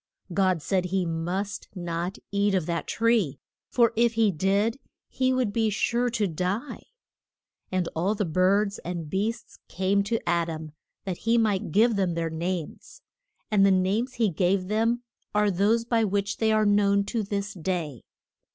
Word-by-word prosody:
God 185 -3 +1
said 185 +1 0
he 185 0 0
must 175 +5 -3
not 175 +1 -3
eat 200 0 +2
of 180 -4 0
that 170 0 -3
tree, 225 - +1 0.3
for 235 -2 +3
if 235 +1 +3
he 220 -2 +3
did 200 - +1 0.3
he 260 0 0
would 255 -5 0
be 225 -1 +2
sure 235 +4 +1
to 225 -3 0
die. 185 - -3 0.8
And 185 -2 0
all 185 +6 +1
the 205 - -1
birds 195 +4 +2
and 170 -3 -5
beasts 220 +4 -3
came 190 +2 +1
to 230 +3 0
A 170 -1 +2
dam, 160 -1 -6 0.3
that 185 -3 -4
he 230 +1 +1
might 215 -3 +1
give 220 +2 +4
them 185 -4 0
their 165 -1 -2
names. 170 0 -5 0.5
And 205 -2 +4
the 195 - +6
names 195 +7 +1
he 225 -4 +1
gave 185 +2 +1
them 230 +3 +1 0.3
are 210 -1 +3
those 210 +5 +2
by 230 -1 +2
which 200 0 -1
they 220 -1 +2
are 215 0 +3
known 200 -1 +3
to 225 +3 -2
this 200 0 -3
day. 165 - -3
200 Hz, 170 wpm, -26 LUFS, 180-220 Hz, 0.8 s, the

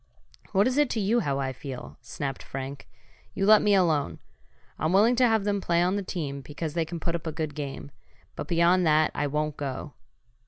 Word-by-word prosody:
"What 200 +1 +4
is 255 +3 +1
it 295 -3 +3
to 225 - -1
you 215 +4 +2
how 140 -10 -1
I 135 -1 -2
feel?" 130 -1 -8
snapped 135 +3 -5
Frank. 135 +1 -7 0.5
"You 195 - 0
let 215 +1 +7
me 205 -1 +4
alone! 155 - +2 0.6
I'm 155 +3 0
willing 220 +6 +5
to 250 0 +5
have 220 -3 +2
them 200 -1 0
play 170 -1 +2
on 180 +2 +1
the 205 - -1
team, 150 -7 -4
because 150 +3 -5
they 165 -1 0
can 170 +1 -6
put 165 +1 -2
up 170 -1 -4
a - - -1
good 155 -1 -4
game. 140 -1 -6 0.4
But - - -5
beyond 170 +2 +3
that 155 0 +4
I 145 - -1
won't 150 +1 -2
go!" 140 +1 -5
160 Hz, 210 wpm, -27 LUFS, 140-195 Hz, 0.6 s, let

